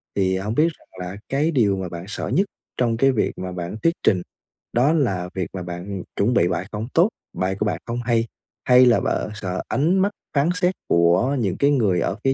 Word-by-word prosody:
thì 95 -1 +1
hông 105 +4 -3
biết 155 +5 +4
rằng - - -25 0.2
là 95 - -7
cái 145 +4 +1
điều 105 -9 +2
mà 95 -1 -4
bạn 85 +1 -7
sợ 110 - -4
nhất 195 +3 +2 0.3
trong 115 -2 +1
cái 135 +3 +4
việc 115 - 0
mà 95 0 -5
bạn 90 +1 -5
thuyết 165 - +4
trình 90 -3 +3 0.5
đó 130 +6 +3
là 95 - 0
việc 95 -3 -1
mà 95 -1 -4
bạn, 90 0 -6
ừm, 100 -3 -5
chuẩn 110 +5 +2
bị 90 - +4
bài 90 +1 -2
không 110 +1 -4
tốt, 175 +6 +5 0.2
bài 95 +1 -1
của 105 - +1
bạn 105 - -1
không 120 +1 -3
hay, 115 -1 +1 0.4
hay 125 0 +7
là 120 -2 +5
bạn - - -1
sợ 95 -3 -3
ánh 170 +7 +2
mắt 200 +2 +2 0.2
phán 145 +4 +3
xét 180 0 +1
của 85 +11 +3
những 100 -6 -1
cái 140 +1 +3
người 105 -10 +2
ở 95 - -1
phía 135 - +3
110 Hz, 235 wpm, -22 LUFS, 95-135 Hz, 0.5 s, hay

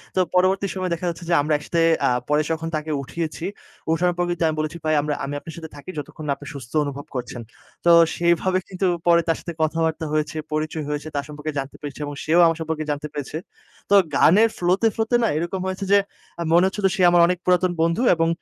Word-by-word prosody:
তো - - +2 0.2
পরবর্তী 190 +2 +3
সময়ে 185 -2 -3
দেখা 170 +2 -4
যাচ্ছে, 170 +1 -6
যে, - - +2
আমরা 150 +1 0
একসাথে 165 +3 -1 0.3
আ - - +4 0.2
পরে 150 +1 +3
যখন 160 0 -2
তাকে 155 0 -3
উঠিয়েছি, 165 +4 -5 0.5
ওঠার 175 +2 +2
পর 175 - +1
কিন্তু 175 -1 -1
আমি 155 - -1
বলেছি, 155 +2 -3
"ভাই 155 0 +2
আমরা 150 0 -2
আমি 140 - -5
আপনার 165 0 -10
সাথে 160 -1 -8
থাকি, 145 +5 -11
যতক্ষণ 150 +1 -7
না - - +1
আপনি - - -12
সুস্থ 130 -4 -9
অনুভব 140 0 -5
করছেন।" 125 -1 -5 0.4
তো 170 - +6 0.2
সেভাবে 175 +2 +2
কিন্তু 190 0 -1 0.2
পরে 170 0 +6
তার 165 - +1
সাথে 170 - -6
কথাবার্তা 160 0 0
হয়েছে, 155 0 -1 0.2
পরিচয় 155 0 -2
হয়েছে, 150 +1 -3
তার 140 - -1
সম্পর্কে 150 +1 -5
জানতে 135 +1 -6
পেরেছি, 145 0 -7
এবং 145 - -6
সেও 165 +3 +3
আমার 165 0 +2
সম্পর্কে 160 -1 -2
জানতে 145 +1 -3
পেরেছে। 145 +1 -5 0.5
তো 200 - +2 0.2
গানের 210 +10 +5
ফ্লোতে, 185 +6 +2
ফ্লোতে 225 +2 0
না - - +3
এরকম 175 +3 -2
হয়েছে, 190 +1 -3
যে, 200 - +7 0.4
আ - - -3
মনে 175 +2 +6
হচ্ছিলো 195 0 0
সে 190 - -1
আমার 175 -1 +5
অনেক 180 0 0
পুরাতন 180 0 +3
বন্ধু, 165 +7 +1
এবং 165 0 +1
165 Hz, 220 wpm, -22 LUFS, 150-180 Hz, 0.5 s, যে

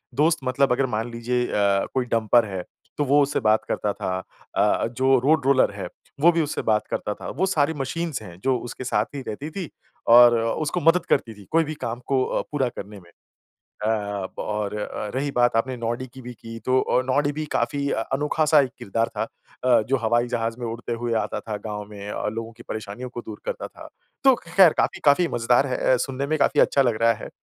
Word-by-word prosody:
दोस्त 160 +4 +3
मतलब 130 +1 +1
अगर 130 +2 +2
मान 115 +2 -3
लीजिए 120 +1 -1
अ, 100 -1 +2
कोई 130 -2 0
डम्पर 115 0 +3
है, 95 -3 -5 0.3
तो 150 - +1
वो 145 +2 +4
उससे 145 - 0
बात 110 0 +3
करता 105 - -1
था। 95 0 -3 0.4
अ, - - +2
जो 130 +2 +2
रोड 150 -1 +3
रोलर 135 -4 +4
है, 95 -3 -5 0.3
वो 170 +4 +6
भी 165 -1 +1
उससे 150 - -2
बात 105 -1 +1
करता 105 - -2
था। - - -8
वो 190 - +2
सारी 160 -5 +1
मशीन्स 150 +1 -3
हैं 90 -5 -11
जो 130 -1 +2
उसके 120 +2 -7
साथ 110 -3 +1
ही 140 - -4
रहती 140 +9 -5
थी 180 -2 -5 0.4
और 120 0 +8
अ, 115 0 0
उसको 155 -2 -2
मदद 165 +3 +4
करती 115 -4 +1
थी। 100 -2 -15
कोई 165 +1 +4
भी 155 0 -5
काम 115 +1 -3
को 130 -2 +2
अ, - - -1
पूरा 140 -4 +1
करने 105 -3 -9
में। 85 - -19 0.8
अ, - - +1 0.5
और 105 -1 -3
अ, 105 0 -4
रही 140 +2 -1
बात 120 -1 +3
आपने 130 +3 0
नॉडी 120 +2 -3
की 130 - -10
भी 125 0 -8
की 115 -1 -10
तो 130 0 +3
अ, 125 - +1
नॉडी 145 +2 +1
भी 155 +1 -4
काफ़ी 140 -1 0
अ, - - 0
अनोखा-सा 150 +2 +3
एक 130 - -2
किरदार 115 +3 -1
था - - +1 0.4
अ, 125 -3 +5
जो 135 - +3
हवाई 120 +2 +2
जहाज़ 115 -1 -2
में 120 - -4
उड़ते 115 +1 -4
हुए 115 0 -2
आता - - -4
था 105 -2 -5
गाँव 105 -1 -4
में, 105 0 -7 0.2
लोगों 115 0 -5
की - - -12
परेशानियों 110 +3 -5
को 120 -1 -7
दूर 110 -2 -8
करता - - -4
था। - - -13 0.4
तो 265 -2 +7
ख़ैर 170 0 +5
काफ़ी, - - +1
काफ़ी 145 +5 +5
मज़ेदार 120 +1 +2
है 130 - -2 0.2
अ, - - +4
सुनने 135 +2 -3
में 155 +1 +1
काफ़ी - - +3
अच्छा 140 - +3
लग 120 -4 +1
रहा 115 0 +5
है। - - -6
125 Hz, 225 wpm, -24 LUFS, 115-140 Hz, 0.8 s, और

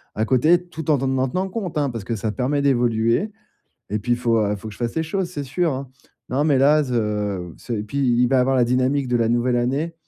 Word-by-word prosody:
à 110 - 0
côté, 155 +9 +3
tout 160 -3 -7
en 150 - +5 0.2
en 130 - +2
tenant 185 +8 -1
compte, 185 -6 -4
hein, 145 -2 +1
parce 115 -5 -6
que 115 +3 -3
ça 105 +1 -2
te - - -12
permet 140 +3 0
d'évoluer 120 - +1 0.6
et 105 - 0
puis 120 +4 -1
il 120 - +1
faut, 115 -2 +2
heu, 105 -2 +1
il 105 - -2
faut 110 +2 -9
que - - -8
je - - -17
fasse 120 -1 -2
les 160 - +1
choses, 180 +2 -2
c'est 145 -5 -5
sûr, 165 +4 0
hein. 135 0 -6 0.4
Non, 140 +3 +1
mais 145 -4 +3
là, 150 +3 +5
ze 105 -7 -2
c'est 120 - -5
et - - -2
puis 110 +7 -5
il 125 -2 +3
va 135 - +2
y - - +4
avoir 130 +1 +2
la 125 - +4
dynamique 130 +3 +1
de 125 - +2
la 115 -1 +1
nouvelle 120 +1 +1
année 140 +7 -1
125 Hz, 275 wpm, -22 LUFS, 115-145 Hz, 0.6 s, en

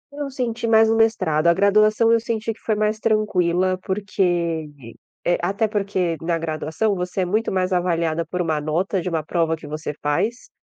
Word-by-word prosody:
Eu 290 -1 -4
senti 240 -3 -3
mais 220 0 +5
o - - +2
mestrado, 190 -9 +2
a 170 - +6
graduação 215 +3 +4
eu 230 - +4
senti 225 -1 -3
que - - -23
foi 220 - -1
mais 215 +1 0
tranquila 185 -4 +1
porque, 175 -5 -1 0.6
eh 175 - +2
até 200 +5 0
porque 195 -5 -1
na 165 0 0
graduação, 160 +6 -1
você 180 +1 -3
é - - +1
muito 215 +5 0
mais 185 0 0
avaliada 170 -2 0
por 180 +3 -5
uma 155 -3 -1
nota 175 +5 -1
de 180 - -3
uma 160 -2 -1
prova 165 0 0
que 160 - -13
você 150 0 -4
faz, 215 +12 -1
185 Hz, 185 wpm, -22 LUFS, 165-215 Hz, 0.6 s, a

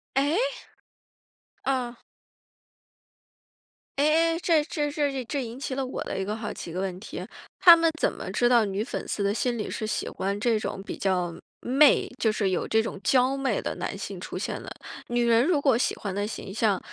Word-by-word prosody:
哎？ 285 +6 +2 1.3
嗯。 250 -3 -1 2.0
唉 285 - +3 0.3
唉， - - -1
这 320 -4 +4
这 295 -3 -2
这 285 -3 -1
这 275 +1 -2
引 235 +3 -7
起 275 - -3
了 270 0 -1
我 255 - -4
的 - - -4
一 - - 0
个 210 +2 -3
好 225 -1 -5
奇 170 - -7
的 180 - -4
问 185 -1 -3
题， - - -7 0.3
他 345 -3 +10
们 330 -1 +2
怎 - - +2
么 - - -6
知 240 - +2
道 240 -2 +5
女 200 +1 -1
粉 - - -5
丝 200 - -2
的 200 +1 +1
心 240 +1 -1
里 210 - -4
是 215 - -3
喜 - - -2
欢 200 +1 -3
这 225 -1 +2
种 195 -2 -4
比 - - -6
较 180 -3 0 0.3
媚， 275 +4 +5
就 220 - +3
是 200 -3 0
有 180 - -1
这 220 0 +3
种 200 - -5
娇 255 +6 +3
媚 270 -1 0
的 - - -3
男 - - -4
性 - - -6
出 - - -6
现 - - -3
的。 - - -8 0.4
女 240 0 +1
人 235 +1 +5
如 320 -2 +2
果 270 -4 +3
喜 245 - +1
欢 195 -3 -5
的 205 +1 -1
形 195 -3 -7
象， 210 -4 +2
235 Hz, 220 characters per minute, -26 LUFS, 205-275 Hz, 2.0 s, 他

